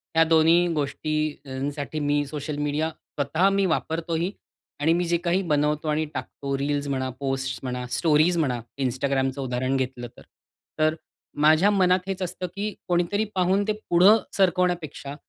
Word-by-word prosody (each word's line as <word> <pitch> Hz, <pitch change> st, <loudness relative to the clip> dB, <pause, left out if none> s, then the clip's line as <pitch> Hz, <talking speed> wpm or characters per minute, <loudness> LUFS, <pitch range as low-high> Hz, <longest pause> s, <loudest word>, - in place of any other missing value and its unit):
ह्या 165 Hz, -, +6 dB
दोन्ही 165 Hz, +2 st, +4 dB
गोष्टींसाठी 145 Hz, -1 st, -3 dB
मी 145 Hz, 0 st, +1 dB
सोशल 145 Hz, 0 st, -5 dB
मीडिया 150 Hz, +2 st, -1 dB
स्वतः 155 Hz, +3 st, -1 dB
मी 195 Hz, 0 st, +2 dB
वापरतोही 165 Hz, +1 st, -1 dB, 0.5 s
आणि 160 Hz, +3 st, +3 dB
मी 175 Hz, +1 st, 0 dB
जे 170 Hz, 0 st, +1 dB
काही 180 Hz, +3 st, +2 dB
बनवतो 150 Hz, +1 st, +1 dB
आणि 155 Hz, +1 st, +1 dB
टाकतो 140 Hz, -1 st, -4 dB
रील्स 145 Hz, +1 st, -1 dB
म्हणा, 130 Hz, -1 st, -1 dB
पोस्ट्स 135 Hz, -2 st, -2 dB
म्हणा, 125 Hz, -1 st, -3 dB
स्टोरीज 165 Hz, +2 st, +3 dB
म्हणा, 130 Hz, -7 st, 0 dB, 0.2 s
Instagramचं 135 Hz, +1 st, -1 dB
उदाहरण 130 Hz, +1 st, -1 dB
घेतलं 125 Hz, -2 st, -3 dB
तर. -, -, -13 dB, 0.6 s
तर 155 Hz, +1 st, +3 dB, 0.5 s
माझ्या 160 Hz, +6 st, +5 dB
मनात 185 Hz, -2 st, +3 dB
हेच 195 Hz, -1 st, -3 dB
असतं 180 Hz, 0 st, -3 dB
की 205 Hz, 0 st, -3 dB
कोणीतरी 180 Hz, +4 st, +1 dB
पाहून 190 Hz, +2 st, +2 dB
ते 215 Hz, -, +2 dB, 0.2 s
पुढं 185 Hz, +6 st, +7 dB, 0.2 s
सरकवण्यापेक्षा 175 Hz, -6 st, 0 dB
155 Hz, 145 wpm, -25 LUFS, 140-175 Hz, 0.6 s, पुढं